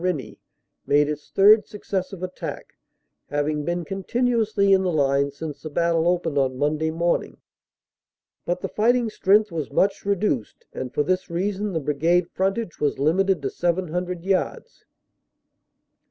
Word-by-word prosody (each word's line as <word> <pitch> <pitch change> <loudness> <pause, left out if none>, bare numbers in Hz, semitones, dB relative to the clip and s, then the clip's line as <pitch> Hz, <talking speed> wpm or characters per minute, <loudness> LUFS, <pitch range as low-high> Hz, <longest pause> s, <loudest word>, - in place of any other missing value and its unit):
Rennie, 180 -7 -3 0.5
made 145 0 +4
its 150 0 -5
third 210 +2 +5
successive 190 -2 -4
attack, 185 0 -6 0.5
having 145 +1 -1
been 175 +2 -2
continuously 215 +1 +1
in 190 - +4
the 185 -1 0
line 140 -2 +2
since 145 +1 -7
the 155 - -6
battle 170 +1 +1
opened 175 -5 +1
on 130 -1 0
Monday 150 +3 0
morning. 170 +2 -1 1.1
But 180 +1 -2
the - - -2
fighting 235 +1 +1
strength 210 0 +3
was 160 -4 -3
much 195 +7 +1
reduced, 200 - -1
and 130 -1 -5
for 150 - +1
this 185 +5 -1
reason 195 +3 -2
the 165 - 0
Brigade 165 +5 +1
frontage 195 0 -2
was 145 - 0
limited 175 +3 +2
to 135 - -2
700 180 0 -2
yards. 190 -1 -2
175 Hz, 140 wpm, -23 LUFS, 150-195 Hz, 1.1 s, third